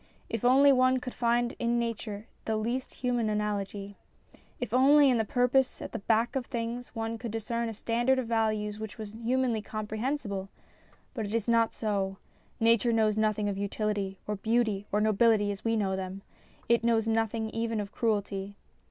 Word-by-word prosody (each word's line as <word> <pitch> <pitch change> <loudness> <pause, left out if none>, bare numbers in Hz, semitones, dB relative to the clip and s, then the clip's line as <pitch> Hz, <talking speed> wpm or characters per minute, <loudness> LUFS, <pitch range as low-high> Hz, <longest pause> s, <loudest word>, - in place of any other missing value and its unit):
If 230 -1 -3
only 270 +3 +6
one 255 0 +4
could 250 0 -6
find 240 0 +1
in 235 0 +1
nature 220 -3 -3 0.2
the 220 - 0
least 240 +4 -2
human 245 -3 -1
analogy! 205 -1 -3 0.6
If 245 -3 -4
only 275 +2 +6
in 240 - +2
the - - +3
purpose 250 +4 +2
at - - -7
the 230 - -4
back 225 +4 +1
of 260 -2 -2
things 235 +1 -4
one 225 0 -3
could 235 - -5
discern 230 +2 -2
a - - -5
standard 240 +5 +1
of 260 - -1
values 215 -2 0
which 220 +1 -7
was 215 -2 -7
humanly 235 0 0
comprehensible! 215 -1 -3 0.6
But 225 -5 -3
it 210 - -3
is 230 -1 -1
not 230 -1 +3
so. 195 -3 -2 0.4
Nature 230 0 +4
knows 220 -2 +2
nothing 215 -1 +1
of 200 -1 -2
utility, 200 -1 -2
or 210 - -2
beauty, 220 -2 0
or 210 - +2
nobility 215 -1 +3
as 200 0 -7
we 225 0 +1
know 195 -3 0
them. 190 +1 -5 0.4
It 235 0 +3
knows 225 -1 +2
nothing 225 0 0
even 225 -1 -1
of 205 -1 -4
cruelty. 205 -4 -1
225 Hz, 180 wpm, -29 LUFS, 210-235 Hz, 0.6 s, only